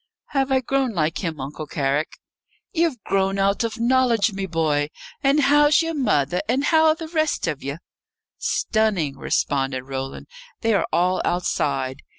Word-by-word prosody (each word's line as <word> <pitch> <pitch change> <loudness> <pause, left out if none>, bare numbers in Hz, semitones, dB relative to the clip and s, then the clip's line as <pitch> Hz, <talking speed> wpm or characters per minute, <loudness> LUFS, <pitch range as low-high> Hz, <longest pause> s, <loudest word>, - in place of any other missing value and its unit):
"Have 270 -1 0
I 260 -1 +3
grown 265 -1 0
like 160 0 0
him, 160 -4 -3
Uncle 145 +3 -6
Carrick?" 140 +1 -1 0.6
"Ye've 325 -7 +1
grown 195 0 0
out 195 +3 +1
of 230 0 -3
knowledge, 235 -3 +3
me 195 0 -3
boy. 155 -4 0 0.3
And 280 +2 +3
how's 295 +3 +5
ye're 330 0 -2
mother, 180 - +1
and 260 +4 +1
how 320 +1 +4
are 310 - +4
the 325 -1 -7
rest 315 -2 0
of 155 -4 -3
ye?" 140 +2 -4 0.6
"Stunning," 200 -10 0
responded 135 -2 -1
Roland. 135 0 -6 0.4
"They 225 -1 +2
are 200 - +1
all 180 +2 +2
outside. 140 -6 -1
195 Hz, 160 wpm, -23 LUFS, -, 0.6 s, how's